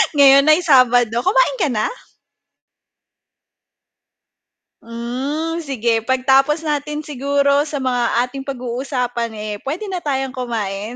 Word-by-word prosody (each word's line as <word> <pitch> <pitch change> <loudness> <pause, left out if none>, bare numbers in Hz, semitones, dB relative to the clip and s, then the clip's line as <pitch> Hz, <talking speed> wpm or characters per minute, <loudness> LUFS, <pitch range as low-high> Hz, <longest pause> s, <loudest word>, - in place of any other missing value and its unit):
ngayon 275 0 +6
ay 310 +4 +4
Sabado, 245 -6 +4
kumain - - +2
ka 350 - +2
na? 215 -5 -1 2.9
Hmm, 265 +8 -4
sige 240 -7 -1
pag-tapos 270 +4 +2
natin 300 0 -3
siguro 280 +1 0
sa 285 -3 -4
mga 245 -2 +1
ating 270 +2 -7
pag-uusapan 250 -2 -3
eh, 210 0 -5
puwede 340 - -5
na 365 - -2
tayong 270 -4 -2
kumain, 225 -4 -4
270 Hz, 110 wpm, -19 LUFS, 240-295 Hz, 2.9 s, ngayon